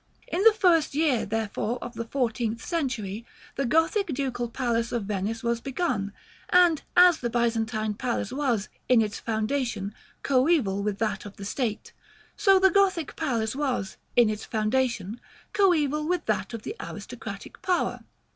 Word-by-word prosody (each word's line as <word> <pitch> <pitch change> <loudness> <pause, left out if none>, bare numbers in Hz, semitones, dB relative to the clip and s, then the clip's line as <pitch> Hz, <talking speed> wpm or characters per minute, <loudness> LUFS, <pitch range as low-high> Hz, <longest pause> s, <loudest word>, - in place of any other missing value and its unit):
" - - -31
In 360 - +1
the 450 - +9
first 340 -9 +3
year, 295 -6 +2
therefore, 220 +2 -2
of 240 - -7
the 230 0 -4
fourteenth 230 -2 -2
century, 235 - -2 0.3
the 275 -2 -1
Gothic 325 - +2
Ducal 260 -5 -2
Palace 235 -2 -1
of 235 -3 -1
Venice 210 +3 -3
was 235 0 0
begun; 250 - -1 0.4
and 350 -4 +5 0.2
as 355 -2 +7
the 240 - -2
Byzantine 225 -2 0
Palace 235 -1 -2
was, 255 -7 0 0.2
in 250 -2 +6
its 210 -1 -4
foundation, 220 -2 -2 0.3
coeval 255 - +2
with 205 -1 -1
that 210 -3 -1
of 200 - -10
the 200 - -7
state, 220 0 -3 0.4
so 390 -2 +5
the 380 0 +5
Gothic 380 -4 +2
Palace 235 -7 -1
was, 260 -9 -2 0.2
in 240 -2 +6
its 215 0 -3
foundation, 225 -1 -1 0.3
coeval 305 -7 +2
with 355 -2 0
that 205 +1 -1
of 225 - -8
the - - -5
aristocratic - - -8
power. 365 -1 0
240 Hz, 155 wpm, -26 LUFS, 215-300 Hz, 0.4 s, the